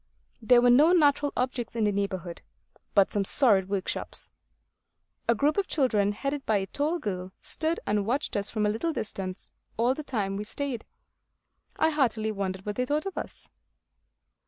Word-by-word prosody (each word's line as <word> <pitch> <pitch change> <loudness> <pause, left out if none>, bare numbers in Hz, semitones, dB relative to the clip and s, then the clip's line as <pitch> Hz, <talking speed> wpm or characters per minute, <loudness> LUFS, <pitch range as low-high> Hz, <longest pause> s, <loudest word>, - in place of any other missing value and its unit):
There 240 +2 +5
were 245 - +6
no 300 +8 +6
natural 290 -3 +3
objects 250 -2 -2
in 225 - 0
the 210 - +3
neighbourhood, 190 -4 -3 0.5
but 200 -2 +5
some 205 - +1
sordid 195 -4 +3
workshops. 195 -2 -2 1.0
A 235 - +5
group 290 - +1
of 400 - +1
children 215 -9 +2
headed 275 +6 -3
by 215 -4 +2
a 195 - -1
tall 295 - -1
girl 185 - -4
stood 320 +1 -1
and 205 0 +1
watched 270 +5 -1
us 200 0 -1
from 215 -2 -1
a - - +3
little 230 +11 -1
distance 195 -6 -3 0.3
all 240 +3 +3
the 305 - -6
time 205 -9 -2
we 205 - -3
stayed. 250 +1 -3 0.9
I 320 - +2
heartily 230 -7 +1
wonder 190 -2 -3
what 210 0 -4
they 250 - +1
thought 300 +5 0
of 390 - -4
us. - - -7
230 Hz, 175 wpm, -27 LUFS, 200-285 Hz, 1.0 s, were